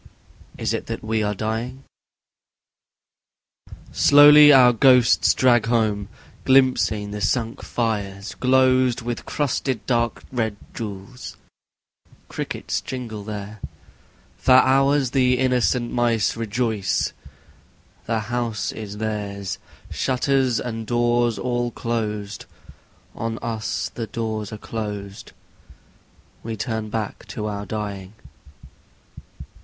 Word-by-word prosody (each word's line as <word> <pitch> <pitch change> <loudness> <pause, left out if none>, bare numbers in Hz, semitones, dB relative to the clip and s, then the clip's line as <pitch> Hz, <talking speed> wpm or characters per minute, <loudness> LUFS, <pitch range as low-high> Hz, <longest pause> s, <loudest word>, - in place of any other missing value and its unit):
Is - - -1
it - - -4
that - - -5
we 110 0 -1
are 105 0 -1
dying? 115 +6 -4 2.1
Slowly 150 +1 +8
our 125 -3 +7
ghosts 125 0 +5
drag 120 -3 +3
home: 110 -4 0 0.3
glimpsing 130 -6 +2
the 105 0 -5
sunk 115 +4 -1
fires 100 -4 -3
glozed 130 -1 +3
With 120 0 -5
crusted 130 -4 -2
dark 120 -2 0
red 110 -4 -1 0.2
jewels; 110 +2 -8 0.9
crickets - - -4
jingle 115 -5 -6
there; 105 0 -7 0.8
For 130 - +3
hours 135 +1 +4
the 125 -2 +3
innocent 125 -1 +1
mice 120 -3 +1
rejoice: 110 -2 -1 0.9
the 115 -1 0
house 115 -2 -2
is 105 -2 -8
theirs; 100 -2 -4 0.3
Shutters 130 -1 +1
and 115 -2 -5
doors 120 -1 +1
all 120 -1 -1
closed: 105 -3 -4 0.7
on 115 0 -4
us 110 -2 -3
the 115 -2 -5
doors 110 -1 -4
are 110 - -6
closed 105 -3 -6 1.1
We 115 -1 -5
turn 110 -1 -3
back 110 -1 -5
to 105 - -5
our 100 -1 -4
dying. 100 -2 -5
115 Hz, 105 wpm, -22 LUFS, 105-125 Hz, 2.1 s, Slowly